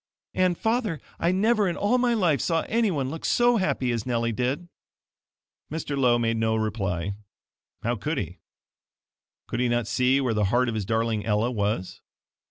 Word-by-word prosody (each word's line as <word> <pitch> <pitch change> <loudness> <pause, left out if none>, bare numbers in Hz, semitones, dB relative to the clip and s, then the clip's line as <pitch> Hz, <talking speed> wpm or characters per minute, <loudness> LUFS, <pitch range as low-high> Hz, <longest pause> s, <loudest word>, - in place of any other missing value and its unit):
And, 185 -2 +2
father, 220 - 0 0.2
I 170 - +2
never 210 +1 +2
in 170 - -3
all 230 +5 +2
my 245 -1 +2
life 170 - +2
saw 165 -1 +1
anyone 185 - 0
look 160 - -7
so 240 0 +3
happy 135 - 0
as 115 -2 -1
Nellie 115 -1 0
did." 125 +9 -2 1.0
Mr. 150 -2 -3
Lowe 125 -3 +3
made 115 -1 0
no 110 0 +1
reply 100 -4 -2 0.7
how - - 0
could - - -2
he? - - -4 1.1
Could - - -3
he 125 -1 +2
not 120 -1 +1
see 125 +4 +2
where 130 -4 0
the 105 -1 +1
heart 120 +5 +2
of - - -2
his 110 -3 -2
darling 110 0 0
Ella 110 +3 +1
was? 100 -4 -2
125 Hz, 175 wpm, -26 LUFS, 115-175 Hz, 1.1 s, so